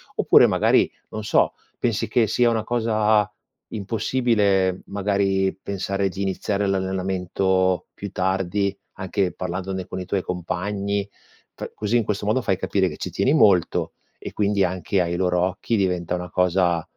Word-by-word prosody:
Oppure -, -, +6 dB
magari, -, -, +3 dB, 0.2 s
non 110 Hz, -1 st, -6 dB
so, -, -, +2 dB, 0.2 s
pensi -, -, -1 dB
che 120 Hz, -, +2 dB
sia 120 Hz, +3 st, +2 dB
una 110 Hz, -2 st, 0 dB
cosa 110 Hz, -3 st, +2 dB, 0.4 s
impossibile, 105 Hz, -3 st, +1 dB
magari, 100 Hz, -1 st, 0 dB
pensare 100 Hz, 0 st, -2 dB
di 95 Hz, +2 st, -4 dB
iniziare 100 Hz, +1 st, -1 dB
l'allenamento 95 Hz, -1 st, 0 dB
più 100 Hz, -, -7 dB
tardi, 95 Hz, +1 st, 0 dB, 0.2 s
anche 95 Hz, -1 st, -1 dB
parlandone 95 Hz, +1 st, -4 dB
con 95 Hz, 0 st, -6 dB
i 90 Hz, -, -5 dB
tuoi 95 Hz, 0 st, -1 dB
compagni, 100 Hz, +3 st, -2 dB, 0.5 s
pr -, -, -7 dB
così 110 Hz, +2 st, -1 dB
in 115 Hz, -, +2 dB
questo 105 Hz, -1 st, -3 dB
modo 110 Hz, +5 st, +1 dB
fai 95 Hz, -6 st, 0 dB
capire 95 Hz, 0 st, 0 dB
che -, -, -9 dB
ci 90 Hz, -, -5 dB
tieni 100 Hz, +10 st, +1 dB
molto 100 Hz, -, +3 dB, 0.2 s
e -, -, -8 dB
quindi, 100 Hz, -1 st, +1 dB
anche 90 Hz, +1 st, 0 dB
ai 85 Hz, 0 st, -1 dB
loro 90 Hz, -1 st, +1 dB
occhi, 95 Hz, +5 st, -1 dB
diventa 90 Hz, -4 st, 0 dB
una 90 Hz, 0 st, -6 dB
cosa 90 Hz, -2 st, +2 dB
95 Hz, 150 wpm, -23 LUFS, 90-105 Hz, 0.5 s, Oppure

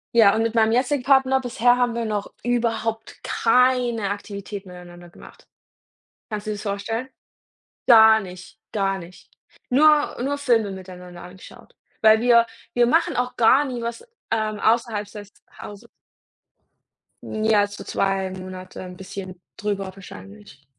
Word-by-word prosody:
Ja, 220 Hz, -3 st, +6 dB
und 225 Hz, -, +1 dB
mit 230 Hz, 0 st, -2 dB
meinem 225 Hz, 0 st, +3 dB
jetzigen 255 Hz, +1 st, 0 dB
Partner 265 Hz, -1 st, +3 dB
bisher 245 Hz, -1 st, +2 dB
haben 245 Hz, -2 st, 0 dB
wir 235 Hz, -, -2 dB
noch 210 Hz, -2 st, -4 dB
überhaupt 230 Hz, -2 st, -2 dB
keine 240 Hz, -3 st, +2 dB
Aktivitäten 200 Hz, -1 st, -7 dB
miteinander 175 Hz, -1 st, -12 dB
gemacht. -, -, -16 dB, 0.8 s
Kannst 210 Hz, 0 st, -5 dB
du -, -, -1 dB
dir 210 Hz, -, -3 dB
das 205 Hz, -, -8 dB
vorstellen? 225 Hz, +5 st, -4 dB, 0.8 s
Gar 220 Hz, -2 st, +8 dB
nicht, 190 Hz, +3 st, -11 dB
gar 195 Hz, -2 st, -1 dB
nicht. 175 Hz, 0 st, -13 dB, 0.4 s
Nur 300 Hz, +3 st, +4 dB
nur 285 Hz, +2 st, -2 dB
Filme 230 Hz, -7 st, +1 dB
miteinander 180 Hz, -2 st, -10 dB
angeschaut. 180 Hz, +1 st, -14 dB, 0.3 s
Weil 220 Hz, 0 st, +5 dB
wir 235 Hz, -1 st, +5 dB, 0.3 s
wir 240 Hz, -1 st, +4 dB
machen 330 Hz, +5 st, +1 dB
auch 250 Hz, 0 st, -1 dB
gar 260 Hz, +5 st, +5 dB
nie 250 Hz, -3 st, -5 dB
was, 235 Hz, -, -6 dB, 0.2 s
ähm, 215 Hz, -2 st, -1 dB
außerhalb 220 Hz, -3 st, 0 dB
des 205 Hz, -1 st, -11 dB, 0.3 s
Hauses. 205 Hz, +3 st, -10 dB, 1.4 s
Ja, 215 Hz, -1 st, +1 dB
so 205 Hz, 0 st, -10 dB
2 195 Hz, -1 st, -1 dB
Monate 185 Hz, 0 st, -9 dB
bisschen 185 Hz, -1 st, -8 dB, 0.2 s
drüber 205 Hz, -2 st, -3 dB
wahrscheinlich. 105 Hz, -, -13 dB
220 Hz, 140 wpm, -22 LUFS, 195-240 Hz, 1.4 s, Gar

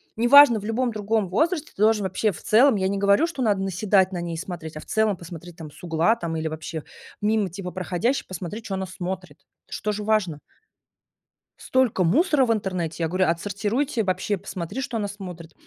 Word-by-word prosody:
Не 230 Hz, +2 st, +1 dB
важно, 280 Hz, -3 st, +8 dB
в 205 Hz, -, -9 dB
любом 240 Hz, +3 st, 0 dB
другом 210 Hz, -2 st, -1 dB
возрасте 315 Hz, -, 0 dB
ты -, -, -20 dB
должен 215 Hz, -1 st, +4 dB
вообще 190 Hz, +3 st, 0 dB
в 160 Hz, -, -11 dB
целом, 245 Hz, +4 st, +5 dB
я 190 Hz, -2 st, 0 dB
не 200 Hz, +1 st, -1 dB
говорю, 200 Hz, +10 st, +3 dB
что 285 Hz, -7 st, -4 dB
надо 205 Hz, -4 st, +1 dB
наседать 195 Hz, 0 st, +2 dB
на 180 Hz, -, -4 dB
ней 170 Hz, -1 st, -4 dB
и -, -, -6 dB
смотреть, 165 Hz, -3 st, -7 dB
а -, -, -5 dB
в -, -, -12 dB
целом 220 Hz, -2 st, +1 dB
посмотреть, 170 Hz, 0 st, -10 dB
там, 160 Hz, -2 st, -8 dB
с -, -, -17 dB
угла, 170 Hz, +6 st, +2 dB
там, 170 Hz, -7 st, -4 dB
или 160 Hz, 0 st, -2 dB
вообще 160 Hz, 0 st, -5 dB, 0.4 s
мимо 210 Hz, -2 st, +1 dB
типа 180 Hz, +1 st, -6 dB
проходящих 185 Hz, +8 st, -1 dB
посмотреть, 185 Hz, +5 st, -6 dB
чё 200 Hz, -, -4 dB
она 190 Hz, 0 st, -3 dB
смотрит. 185 Hz, 0 st, -6 dB, 0.3 s
Это -, -, -11 dB
ж -, -, -12 dB
тоже 210 Hz, 0 st, -2 dB
важно. 205 Hz, -8 st, 0 dB, 1.2 s
Столько 255 Hz, -7 st, +1 dB
мусора 285 Hz, -, +3 dB
в 230 Hz, -, +2 dB
интернете. 180 Hz, -6 st, -3 dB
Я -, -, +2 dB
говорю: 185 Hz, +3 st, +1 dB
"Отсортируйте. 210 Hz, -, -1 dB
Вообще 190 Hz, +2 st, -1 dB
посмотри, 190 Hz, +4 st, -5 dB
что 255 Hz, -3 st, -3 dB
она 205 Hz, -2 st, -2 dB
смотрит". 180 Hz, -5 st, -9 dB
195 Hz, 205 wpm, -24 LUFS, 175-220 Hz, 1.2 s, важно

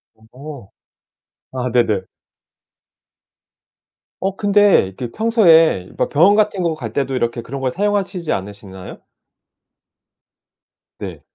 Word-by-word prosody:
어. 125 Hz, +1 st, -12 dB, 0.8 s
아 125 Hz, -1 st, -3 dB
네네. 110 Hz, -5 st, +1 dB, 2.2 s
어 195 Hz, 0 st, -2 dB
근데 205 Hz, -, +3 dB
이렇게 115 Hz, +5 st, -7 dB
평소에 165 Hz, -, +3 dB
막 -, -, 0 dB
병원 175 Hz, +8 st, +4 dB
같은 210 Hz, -3 st, +1 dB
거 170 Hz, -2 st, 0 dB
갈 120 Hz, -8 st, -7 dB
때도 135 Hz, +2 st, -2 dB
이렇게 120 Hz, -1 st, -2 dB
그런 135 Hz, +4 st, -7 dB
걸 130 Hz, -, 0 dB
사용하시지 195 Hz, -3 st, -2 dB
않으시나요? 95 Hz, -1 st, -8 dB, 2.0 s
네. -, -, -8 dB
140 Hz, 205 characters per minute, -18 LUFS, -, 2.2 s, 병원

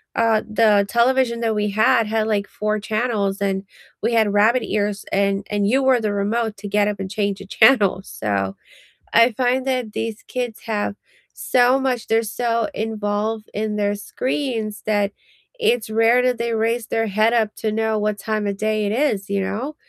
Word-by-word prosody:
Uh, 225 Hz, -2 st, +3 dB
the 215 Hz, -2 st, +3 dB
television 235 Hz, 0 st, +2 dB
that 225 Hz, -2 st, 0 dB
we 210 Hz, -1 st, 0 dB
had 230 Hz, +2 st, +3 dB
had, 220 Hz, 0 st, 0 dB
like, 205 Hz, -2 st, 0 dB
4 215 Hz, 0 st, -2 dB
channels 215 Hz, -2 st, -1 dB
and 195 Hz, -1 st, -1 dB, 0.4 s
we 230 Hz, +1 st, +1 dB
had 220 Hz, -3 st, +3 dB
rabbit 225 Hz, +4 st, +3 dB
ears 205 Hz, -1 st, -2 dB
and 195 Hz, 0 st, +1 dB
and 205 Hz, -1 st, 0 dB
you 265 Hz, +5 st, +2 dB
were 260 Hz, -2 st, +4 dB
the 210 Hz, -2 st, -1 dB
remote 215 Hz, +2 st, -1 dB
to 205 Hz, +1 st, -7 dB
get 205 Hz, +1 st, +2 dB
up 205 Hz, -1 st, -3 dB
and 190 Hz, -1 st, -4 dB
change 200 Hz, -1 st, -1 dB
the 195 Hz, -, -9 dB
channel, 210 Hz, -4 st, +4 dB
so 100 Hz, -, -3 dB, 0.6 s
I 230 Hz, +1 st, +6 dB
find 255 Hz, +3 st, 0 dB
that 250 Hz, -5 st, -1 dB
these 225 Hz, -1 st, -4 dB
kids 245 Hz, -3 st, -4 dB
have 210 Hz, -2 st, -2 dB, 0.4 s
so 250 Hz, +1 st, +2 dB
much, 255 Hz, -3 st, -1 dB
they're 225 Hz, 0 st, +3 dB
so 230 Hz, 0 st, -1 dB
involved 215 Hz, 0 st, -2 dB
in 210 Hz, 0 st, -2 dB
their 205 Hz, 0 st, 0 dB
screens 225 Hz, -1 st, -3 dB
that 205 Hz, -2 st, +1 dB, 0.5 s
it's 245 Hz, -, +1 dB
rare 225 Hz, +3 st, +4 dB
that 250 Hz, -1 st, +1 dB
they 235 Hz, 0 st, -2 dB
raise 225 Hz, +1 st, 0 dB
their 225 Hz, -1 st, 0 dB
head 215 Hz, +3 st, +2 dB
up 220 Hz, -3 st, +1 dB
to 215 Hz, -, -2 dB
know 220 Hz, 0 st, 0 dB
what 210 Hz, -1 st, -1 dB
time 215 Hz, -1 st, -2 dB
of 200 Hz, -1 st, -3 dB
day 215 Hz, 0 st, 0 dB
it 200 Hz, -, -1 dB
is, 220 Hz, -6 st, 0 dB
you 200 Hz, -1 st, 0 dB
know? 220 Hz, +11 st, -3 dB
215 Hz, 185 wpm, -21 LUFS, 205-235 Hz, 0.6 s, I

